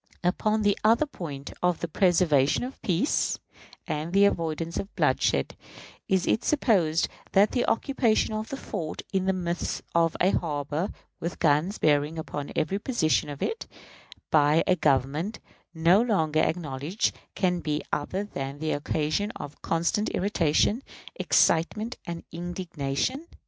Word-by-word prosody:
Upon 215 Hz, +4 st, +1 dB
the 205 Hz, -1 st, +3 dB
other 230 Hz, +7 st, +4 dB
point 145 Hz, -, -7 dB
of 180 Hz, -2 st, +2 dB
the 170 Hz, -, -1 dB
preservation 165 Hz, -, +3 dB
of 255 Hz, +2 st, -4 dB
the -, -, -11 dB
peace, 190 Hz, -, +1 dB, 0.5 s
and 155 Hz, +3 st, -3 dB
the 200 Hz, +1 st, +6 dB
avoidance 165 Hz, -3 st, -1 dB
of 200 Hz, -, -5 dB
bloodshed -, -, +1 dB, 0.5 s
is 190 Hz, -1 st, +2 dB
it 225 Hz, -, +1 dB
supposed 185 Hz, -, +2 dB, 0.3 s
that 200 Hz, +2 st, +5 dB
the 245 Hz, -, 0 dB
occupation 230 Hz, -3 st, +1 dB
of 215 Hz, +1 st, -4 dB
a 275 Hz, -, -3 dB
fort 170 Hz, -, -5 dB
in 190 Hz, -1 st, +1 dB
the -, -, +4 dB
midst 175 Hz, -2 st, -3 dB
of 165 Hz, -1 st, +2 dB
a 185 Hz, -, +4 dB
harbor, 150 Hz, +2 st, -1 dB, 0.3 s
with 170 Hz, +1 st, -4 dB
guns 160 Hz, +6 st, +2 dB
bearing 150 Hz, +1 st, +2 dB
upon 145 Hz, -2 st, -5 dB
every 195 Hz, +5 st, 0 dB
position 160 Hz, -, +1 dB
of 145 Hz, -1 st, -5 dB
it, 450 Hz, -, -3 dB, 0.6 s
by 150 Hz, +1 st, +4 dB
a 185 Hz, -, +3 dB
Government 150 Hz, -, 0 dB, 0.3 s
no 170 Hz, +4 st, +4 dB
longer 160 Hz, -10 st, +1 dB
acknowledged, 155 Hz, +2 st, -1 dB, 0.2 s
can 180 Hz, -2 st, +1 dB
be 150 Hz, -2 st, -2 dB
other 185 Hz, +7 st, -1 dB
than 140 Hz, -8 st, -5 dB
the 155 Hz, +1 st, -2 dB
occasion 155 Hz, +6 st, -1 dB
of 145 Hz, -, -8 dB
constant 170 Hz, +6 st, 0 dB
irritation, 195 Hz, -, +2 dB, 0.3 s
excitement, 215 Hz, -, +2 dB
and 170 Hz, -1 st, -5 dB
indignation? 175 Hz, -, -3 dB
170 Hz, 145 wpm, -27 LUFS, 155-205 Hz, 0.6 s, the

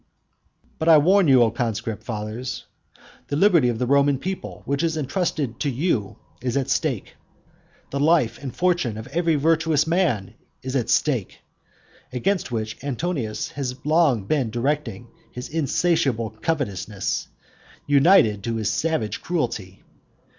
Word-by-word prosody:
But 160 Hz, -, +1 dB
I 160 Hz, -, +9 dB
warn 185 Hz, +4 st, +4 dB
you, 130 Hz, -3 st, +6 dB
O 115 Hz, -, +2 dB
conscript 115 Hz, -2 st, -3 dB
fathers, 110 Hz, +3 st, -5 dB, 0.6 s
the 145 Hz, -, -2 dB
liberty 170 Hz, -6 st, +4 dB
of 120 Hz, -, -1 dB
the 125 Hz, -, 0 dB
Roman 140 Hz, +1 st, +3 dB
people, 190 Hz, +7 st, -6 dB
which 140 Hz, +1 st, -1 dB
is 165 Hz, -1 st, 0 dB
entrusted 145 Hz, -4 st, -2 dB
to 145 Hz, -, 0 dB
you, 130 Hz, -, -1 dB, 0.2 s
is 125 Hz, +1 st, -1 dB
at 135 Hz, -, -1 dB
stake. -, -, -1 dB, 0.7 s
The 140 Hz, -, -2 dB
life 145 Hz, -7 st, +2 dB
and 135 Hz, -3 st, -5 dB
fortune 175 Hz, -11 st, +1 dB
of 110 Hz, -, -7 dB
every 165 Hz, -1 st, +1 dB
virtuous 160 Hz, 0 st, +2 dB
man 155 Hz, -, 0 dB, 0.3 s
is 130 Hz, +1 st, -4 dB
at 120 Hz, -3 st, 0 dB
stake, 125 Hz, -11 st, 0 dB, 0.7 s
against 170 Hz, +7 st, -1 dB
which 110 Hz, +1 st, -4 dB
Antonius 140 Hz, -5 st, -3 dB
has 130 Hz, -3 st, -4 dB
long 150 Hz, -, +3 dB
been 130 Hz, +2 st, 0 dB
directing 120 Hz, -2 st, -2 dB, 0.3 s
his 125 Hz, -, -6 dB
insatiable 140 Hz, -, 0 dB
covetousness, 105 Hz, -, -2 dB, 0.6 s
united 140 Hz, -, +4 dB
to 115 Hz, -, -1 dB
his 110 Hz, -1 st, -1 dB
savage 160 Hz, -9 st, -1 dB
cruelty. 115 Hz, -, -3 dB
135 Hz, 140 wpm, -23 LUFS, 115-160 Hz, 0.7 s, I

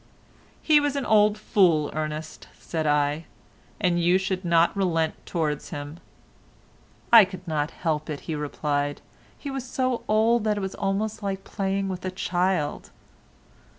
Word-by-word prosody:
"He 305 Hz, -2 st, +6 dB
was 290 Hz, -1 st, -1 dB
an 280 Hz, -2 st, -2 dB
old 210 Hz, -1 st, +4 dB
fool, 175 Hz, -8 st, +2 dB
Ernest," 155 Hz, 0 st, -5 dB
said 160 Hz, -2 st, -3 dB
I, 150 Hz, +2 st, +1 dB, 0.5 s
"and 175 Hz, -3 st, +1 dB
you 175 Hz, +2 st, +4 dB
should 190 Hz, 0 st, -2 dB
not 170 Hz, 0 st, +3 dB
relent 165 Hz, -5 st, +1 dB
towards 155 Hz, -4 st, -2 dB
him." 145 Hz, +3 st, -7 dB, 1.1 s
"I 230 Hz, -2 st, +11 dB
could 185 Hz, -1 st, -7 dB
not 150 Hz, -2 st, -1 dB
help 155 Hz, -3 st, -3 dB
it," 150 Hz, -2 st, -4 dB
he 165 Hz, -, -5 dB
replied, 145 Hz, -1 st, -2 dB, 0.4 s
"he 280 Hz, -, -6 dB
was 270 Hz, -2 st, -4 dB
so 255 Hz, -1 st, -1 dB
old 220 Hz, +2 st, +3 dB
that 210 Hz, -1 st, +1 dB
it -, -, -2 dB
was 190 Hz, 0 st, -4 dB
almost 210 Hz, +3 st, -2 dB
like 195 Hz, -1 st, -3 dB
playing 195 Hz, -1 st, -2 dB
with 185 Hz, -1 st, -5 dB
a 185 Hz, -, -2 dB
child." 180 Hz, -3 st, -1 dB
185 Hz, 150 wpm, -25 LUFS, 155-205 Hz, 1.1 s, I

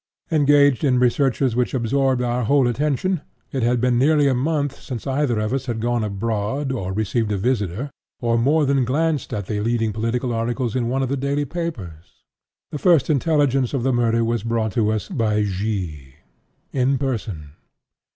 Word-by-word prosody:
Engaged 145 Hz, -3 st, +4 dB
in 130 Hz, -4 st, +3 dB
researches 125 Hz, 0 st, +2 dB
which 125 Hz, +2 st, 0 dB
absorbed 130 Hz, +1 st, +1 dB
our 120 Hz, 0 st, -1 dB
whole 140 Hz, +1 st, +3 dB
attention, 150 Hz, +7 st, 0 dB, 0.3 s
it 135 Hz, -, -2 dB
had 120 Hz, +1 st, +2 dB
been 120 Hz, 0 st, +2 dB
nearly 145 Hz, +1 st, +4 dB
a 135 Hz, -, +3 dB
month 145 Hz, +1 st, -1 dB
since 125 Hz, -5 st, -6 dB
either 135 Hz, -3 st, 0 dB
of 110 Hz, +3 st, -1 dB
us 135 Hz, 0 st, -2 dB
had 115 Hz, -2 st, -2 dB
gone 120 Hz, 0 st, 0 dB
abroad, 110 Hz, +6 st, -2 dB
or 95 Hz, -8 st, -3 dB
received 110 Hz, +2 st, -1 dB
a 100 Hz, -, 0 dB
visitor, 110 Hz, +3 st, -1 dB, 0.3 s
or 115 Hz, -1 st, +1 dB
more 145 Hz, +6 st, +3 dB
than 135 Hz, -1 st, +2 dB
glanced 150 Hz, +3 st, 0 dB
at 105 Hz, -2 st, -3 dB
the 105 Hz, +1 st, -3 dB
leading 115 Hz, -1 st, 0 dB
political 115 Hz, +3 st, -1 dB
articles 115 Hz, +1 st, -2 dB
in 120 Hz, -2 st, 0 dB
one 135 Hz, +2 st, 0 dB
of 130 Hz, -, -2 dB
the 140 Hz, -, 0 dB
daily 140 Hz, +2 st, -1 dB
papers. 115 Hz, -, -7 dB, 0.5 s
The 150 Hz, -, -4 dB
first 165 Hz, -4 st, +4 dB
intelligence 140 Hz, -3 st, +1 dB
of 125 Hz, -, -1 dB
the 135 Hz, 0 st, +1 dB
murder 115 Hz, -1 st, +2 dB
was 115 Hz, -1 st, -1 dB
brought 115 Hz, -2 st, -1 dB
us 110 Hz, -1 st, 0 dB
by 110 Hz, -, 0 dB
G——, 90 Hz, -9 st, -4 dB, 0.6 s
in 135 Hz, +1 st, +2 dB
person. 105 Hz, -, -4 dB
125 Hz, 175 wpm, -22 LUFS, 110-140 Hz, 0.6 s, Engaged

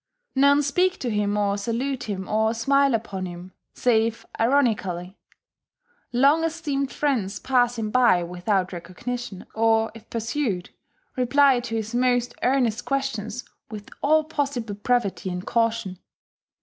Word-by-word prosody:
None 280 Hz, +2 st, +4 dB
speak 360 Hz, +7 st, +1 dB
to 245 Hz, -, -3 dB
him 210 Hz, -1 st, 0 dB
or 205 Hz, -1 st, +1 dB
salute 245 Hz, +5 st, -2 dB
him 190 Hz, -3 st, -4 dB
or 220 Hz, +1 st, +1 dB
smile 275 Hz, +2 st, +3 dB
upon 195 Hz, -4 st, -4 dB
him 175 Hz, +1 st, -9 dB, 0.2 s
save 230 Hz, -1 st, +1 dB
ironically: 210 Hz, -8 st, +1 dB, 1.0 s
long 280 Hz, +6 st, +4 dB
esteemed 300 Hz, -4 st, -2 dB
friends 230 Hz, -10 st, -1 dB
pass 245 Hz, -2 st, +1 dB
him 215 Hz, -2 st, -3 dB
by 235 Hz, -8 st, +4 dB
without 180 Hz, +2 st, -1 dB
recognition, 190 Hz, +4 st, -6 dB
or, 225 Hz, 0 st, +2 dB
if 225 Hz, 0 st, -14 dB
pursued, 225 Hz, -5 st, -2 dB, 0.4 s
reply 265 Hz, +1 st, +4 dB
to 235 Hz, -2 st, -5 dB
his 220 Hz, +1 st, -3 dB
most 245 Hz, 0 st, +1 dB
earnest 245 Hz, -3 st, +1 dB
questions 270 Hz, -4 st, -3 dB, 0.2 s
with 210 Hz, -2 st, -9 dB
all 310 Hz, +2 st, +4 dB
possible 275 Hz, -8 st, -3 dB
brevity 205 Hz, -2 st, -1 dB
and 180 Hz, 0 st, -5 dB
caution. 230 Hz, -5 st, 0 dB
230 Hz, 130 wpm, -24 LUFS, 205-270 Hz, 1.0 s, None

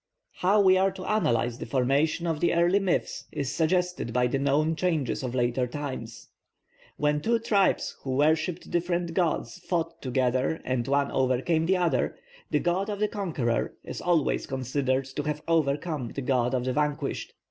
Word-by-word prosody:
How 195 Hz, +4 st, +3 dB
we 185 Hz, -2 st, +6 dB
are 190 Hz, +1 st, +3 dB
to 190 Hz, -1 st, -8 dB
analyse 120 Hz, -, +1 dB
the -, -, -6 dB
formation 140 Hz, +6 st, +1 dB
of 165 Hz, -3 st, -1 dB
the 170 Hz, -, +2 dB
early 175 Hz, +3 st, +4 dB
myths 195 Hz, -3 st, -1 dB
is 140 Hz, -1 st, -3 dB
suggested 180 Hz, -5 st, 0 dB
by 125 Hz, +1 st, +2 dB
the 130 Hz, +2 st, 0 dB
known 145 Hz, +4 st, +2 dB
changes 155 Hz, -7 st, 0 dB
of 130 Hz, -1 st, -4 dB
later 125 Hz, 0 st, +1 dB
times. 120 Hz, -5 st, -6 dB, 0.7 s
When 150 Hz, 0 st, +1 dB
two 230 Hz, +7 st, +2 dB
tribes 205 Hz, -4 st, +1 dB
who 130 Hz, -1 st, -3 dB
worshipped 160 Hz, +4 st, +1 dB
different 175 Hz, 0 st, -1 dB
gods 175 Hz, +1 st, -1 dB
fought 165 Hz, -2 st, -2 dB
together 130 Hz, +3 st, 0 dB
and 125 Hz, -1 st, -1 dB
one 140 Hz, 0 st, +1 dB
overcame 135 Hz, +6 st, +1 dB
the 190 Hz, +1 st, +3 dB
other, 175 Hz, -2 st, 0 dB, 0.3 s
the -, -, +2 dB
god 185 Hz, +4 st, 0 dB
of 205 Hz, -, -2 dB
the 210 Hz, -, +2 dB
conqueror 160 Hz, -, -2 dB
is -, -, -6 dB
always 170 Hz, -5 st, +1 dB
considered 130 Hz, 0 st, -1 dB
to 135 Hz, +2 st, -4 dB
have 150 Hz, 0 st, -3 dB
overcome 150 Hz, -3 st, 0 dB
the 140 Hz, -, -5 dB
god 125 Hz, -1 st, +1 dB
of 125 Hz, -1 st, -1 dB
the 130 Hz, -, 0 dB
vanquished. 150 Hz, -1 st, -2 dB
150 Hz, 170 wpm, -27 LUFS, 130-175 Hz, 0.7 s, we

